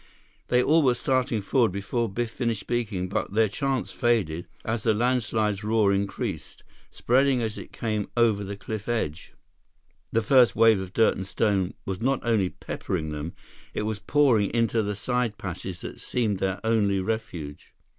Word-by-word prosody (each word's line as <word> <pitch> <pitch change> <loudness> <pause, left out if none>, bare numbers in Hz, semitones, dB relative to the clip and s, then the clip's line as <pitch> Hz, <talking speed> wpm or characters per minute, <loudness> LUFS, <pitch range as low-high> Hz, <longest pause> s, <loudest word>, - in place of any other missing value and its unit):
They 125 0 +3
all 160 +3 +4
were 130 -4 +3
starting 125 -4 0
forward 115 0 +2
before 105 +4 -2
Biff 115 +3 -3
finished 115 -4 -2
speaking, 105 -5 -2
but 95 - -3
their 110 +1 +4
chance 135 +4 -2
faded 105 - 0 0.2
as 110 0 -1
the 110 0 +2
landslide's 110 -3 0
roar 105 -2 +3
increased. 100 0 -3 0.3
Spreading 130 +1 +2
as 110 -1 -3
it - - -10
came 110 -3 -2
over 110 -4 +3
the 100 0 -6
cliff 110 +1 -6
edge, 90 -8 -3 0.8
the 115 - +1
first 125 +1 +5
wave 115 -2 +5
of 95 -1 -6
dirt 115 - +4
and 95 - -5
stone 95 -3 0
was 95 +1 -4
not 135 +2 +1
only 110 -6 +2
peppering 80 -3 -4
them; 75 +3 -5 0.4
it - - -1
was 110 -1 -2
pouring 125 -7 +3
into 115 -1 +2
the 105 -1 -2
side 120 +1 -1
passage 90 -1 -6
that - - -7
seemed 110 -6 -1
their 95 0 -1
only 105 -3 +2
refuge. 90 -8 -5
110 Hz, 165 wpm, -26 LUFS, 100-120 Hz, 0.8 s, first